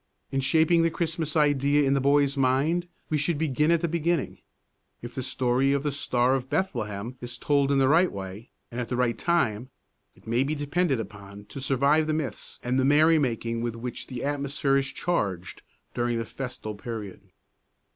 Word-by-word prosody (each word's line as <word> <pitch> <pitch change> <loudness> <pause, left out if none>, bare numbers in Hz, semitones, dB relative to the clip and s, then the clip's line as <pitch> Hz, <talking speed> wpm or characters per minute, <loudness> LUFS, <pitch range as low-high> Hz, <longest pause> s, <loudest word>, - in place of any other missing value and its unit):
In 135 - 0
shaping 160 +5 +3
the 165 - +3
Christmas 165 -2 -2
idea 145 -1 +3
in 135 0 +2
the 140 - +2
boy's 140 +1 +3
mind 140 +7 +1 0.2
we 155 - +2
should 145 +2 0
begin 150 0 +1
at 170 -1 +3
the 170 - +1
beginning. 170 +1 -1 0.6
If 120 0 -7
the 130 - -3
story 130 +1 +1
of 140 0 0
the 145 - 0
Star 125 -2 +1
of 130 -1 -2
Bethlehem 120 - -2
is 120 -1 -6
told 140 +1 +2
in 140 - +3
the 135 -1 +4
right 170 +6 +4
way 95 +4 -8 0.2
and 120 +1 -3
at 120 - -4
the 125 - -2
right 120 -1 +1
time, 125 -9 0 0.5
it - - -23
may 115 +2 +1
be 150 +3 -1
depended 145 -1 0
upon 100 -1 -9
to 135 - -7
survive 140 +4 +2
the 155 - +1
myths 140 -9 -5
and 125 +2 +1
the - - +2
merry 155 +4 +5
making 115 -3 -1
with 120 -1 -2
which 120 +1 -6
the 125 -2 -6
atmosphere 140 -1 0
is 135 0 0
charged 95 - -2 0.3
during 120 -1 0
the 115 - -2
festal 125 -5 -6
period. 105 -2 -7
135 Hz, 190 wpm, -26 LUFS, 120-150 Hz, 0.6 s, merry